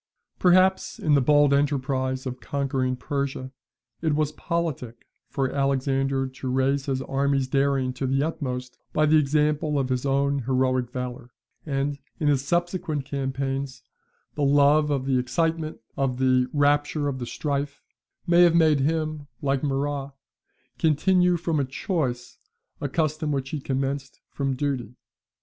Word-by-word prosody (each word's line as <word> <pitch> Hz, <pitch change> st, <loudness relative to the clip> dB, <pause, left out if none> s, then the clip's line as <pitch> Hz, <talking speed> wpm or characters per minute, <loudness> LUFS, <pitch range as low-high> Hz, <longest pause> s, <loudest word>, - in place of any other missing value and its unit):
Perhaps 185 Hz, +1 st, +3 dB
in 150 Hz, -, +1 dB
the 140 Hz, -, +5 dB
bold 145 Hz, +1 st, +4 dB
enterprise 130 Hz, -2 st, 0 dB
of 130 Hz, -1 st, -5 dB
conquering 135 Hz, -2 st, -1 dB
Persia, 135 Hz, 0 st, -3 dB, 0.5 s
it 160 Hz, -2 st, +1 dB
was 155 Hz, -1 st, +1 dB
politic 155 Hz, -8 st, -3 dB, 0.2 s
for 135 Hz, -2 st, -1 dB
Alexander 135 Hz, -1 st, 0 dB
to 130 Hz, 0 st, -6 dB
raise 135 Hz, +2 st, +1 dB
his 135 Hz, -1 st, -1 dB
army's 135 Hz, -1 st, 0 dB
daring 135 Hz, -1 st, +1 dB
to 130 Hz, +1 st, -3 dB
the 135 Hz, +2 st, +1 dB
utmost 125 Hz, -6 st, -4 dB
by 155 Hz, -, +3 dB
the 155 Hz, +1 st, +5 dB
example 150 Hz, +1 st, +1 dB
of 135 Hz, -2 st, 0 dB
his 125 Hz, -1 st, -1 dB
own 140 Hz, 0 st, +1 dB
heroic 130 Hz, -1 st, 0 dB
valour: 125 Hz, -1 st, -6 dB, 0.4 s
and, 140 Hz, 0 st, -1 dB, 0.2 s
in 150 Hz, -, +2 dB
his 135 Hz, -2 st, +2 dB
subsequent 170 Hz, -2 st, -1 dB
campaigns, 135 Hz, -1 st, -3 dB, 0.5 s
the 150 Hz, -, -4 dB
love 145 Hz, +2 st, +4 dB
of 135 Hz, -3 st, 0 dB
the 130 Hz, -2 st, +2 dB
excitement, 160 Hz, +5 st, -1 dB, 0.2 s
of 135 Hz, -2 st, -1 dB
"the 130 Hz, -1 st, +2 dB
rapture 145 Hz, 0 st, +2 dB
of 135 Hz, -2 st, -3 dB
the 120 Hz, -, -5 dB
strife," 140 Hz, 0 st, -3 dB, 0.4 s
may 175 Hz, -1 st, +5 dB
have 170 Hz, -1 st, +6 dB
made 155 Hz, -3 st, +4 dB
him, 155 Hz, 0 st, -1 dB
like 135 Hz, -1 st, 0 dB
Murat, 140 Hz, -1 st, -2 dB, 0.6 s
continue 180 Hz, +3 st, +3 dB
from 165 Hz, -3 st, 0 dB
choice 130 Hz, -4 st, -3 dB, 0.4 s
a 145 Hz, -, -2 dB
custom 155 Hz, +1 st, -1 dB
which 135 Hz, -1 st, -2 dB
he 150 Hz, -, -3 dB
commenced 135 Hz, 0 st, -3 dB
from 135 Hz, -1 st, -1 dB
duty. 130 Hz, -4 st, -3 dB
140 Hz, 145 wpm, -25 LUFS, 130-150 Hz, 0.6 s, have